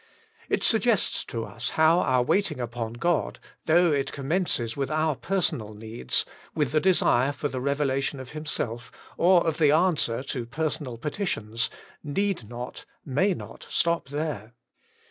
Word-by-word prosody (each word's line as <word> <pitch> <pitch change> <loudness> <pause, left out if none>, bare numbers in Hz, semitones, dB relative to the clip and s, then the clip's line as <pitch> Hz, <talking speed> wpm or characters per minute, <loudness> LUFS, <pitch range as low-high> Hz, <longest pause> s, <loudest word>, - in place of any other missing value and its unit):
It - - +1
suggests 225 -2 +3
to 115 -1 -4
us 115 +4 -4
how 160 +2 +6
our 130 -6 +3
waiting 170 +1 +1
upon 120 -2 -3
God, 170 +6 0 0.3
though 170 +1 +5
it 140 -2 0
commences 140 -5 -1
with 140 -1 -2
our 155 -1 +1
personal 130 - -1
needs, 110 - -2 0.3
with 150 -5 +1
the 155 - +3
desire 145 -7 +3
for 145 +1 -3
the 130 -1 -4
revelation 140 0 0
of 130 -1 -8
Himself, 120 -6 -4 0.2
or 175 0 +5
of 165 -1 0
the 150 -2 +5
answer 155 -7 +2
to 125 -3 -4
personal 150 -2 -3
petitions, 115 - -2 0.3
need 170 - -1
not, 120 +1 -7 0.2
may 155 +8 +2
not, - - -10
stop 170 -4 +1
there. 145 -7 -3
140 Hz, 145 wpm, -26 LUFS, 120-165 Hz, 0.3 s, how